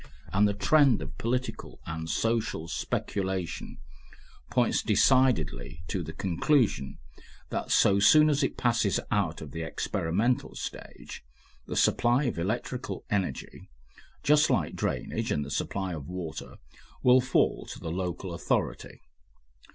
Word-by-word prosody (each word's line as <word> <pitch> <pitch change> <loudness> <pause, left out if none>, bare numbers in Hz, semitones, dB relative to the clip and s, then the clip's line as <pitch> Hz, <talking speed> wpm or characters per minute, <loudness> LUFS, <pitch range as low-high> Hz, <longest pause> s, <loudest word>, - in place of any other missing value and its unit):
And 105 +2 +4
the 100 - -1
trend 135 +4 +4
of 70 +4 -9
political 125 +2 -3
and 80 0 -5
social 115 -6 -1
speculation 95 0 -3 0.7
points - - +2
decidedly 80 - +2
to 95 - -1
the 80 -1 -6
conclusion 95 - +1 0.5
that - - -3
so 100 - +4
soon 150 +9 +7
as 145 -1 +2
it 135 - -1
passes 115 -5 +2
out 95 -6 0
of 75 -3 -8
the 80 - -5
experimental 90 +8 -1
stage, - - -8 0.4
the - - -4
supply 120 +4 +3
of 125 - -2
electrical 120 +7 -3
energy, 95 -10 -3 0.5
just 150 +2 +4
like - - 0
drainage - - -2
and 75 - 0
the 70 - -8
supply 95 +5 -2
of 75 -4 -7
water, 90 -4 -6 0.5
will 125 +1 +6
fall 125 - +1
to - - -8
the 80 -2 -5
local 90 0 -3
authority. 85 - -2
100 Hz, 130 wpm, -28 LUFS, 80-125 Hz, 0.7 s, soon